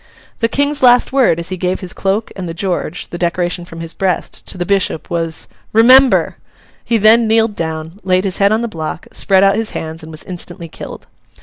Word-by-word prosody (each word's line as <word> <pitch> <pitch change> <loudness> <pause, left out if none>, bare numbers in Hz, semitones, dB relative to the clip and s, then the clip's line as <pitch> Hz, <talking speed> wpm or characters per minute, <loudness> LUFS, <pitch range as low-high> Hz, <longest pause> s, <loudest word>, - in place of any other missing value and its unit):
The 230 - +2
King's 285 +4 0
last 250 0 +5
word, 255 -11 +3
as 170 - -4
he 185 - -4
gave 180 +1 -2
his 180 -2 -3
cloak 200 +3 -1
and 185 -3 -5
the 165 - -6
George—the 175 -1 -3
decoration 175 0 -1
from 165 -1 -9
his 165 0 -7
breast—to 185 0 -3
the 175 - -2
bishop, 195 -4 -1
was, 165 -1 -2 0.3
'Remember!' 255 +4 +5 0.5
He 235 - +1
then 220 +2 +5
kneeled 225 -1 +2
down, 160 +2 -5
laid 185 0 +2
his 195 -2 -2
head 200 0 +4
on 220 +2 +1
the - - -1
block, 160 -6 -5
spread 195 -1 +2
out 195 0 +4
his 225 0 -2
hands, 160 +1 -6
and 160 - -11
was 155 - -7
instantly 175 -1 -8
killed. - - -9
185 Hz, 200 wpm, -16 LUFS, 170-220 Hz, 0.5 s, last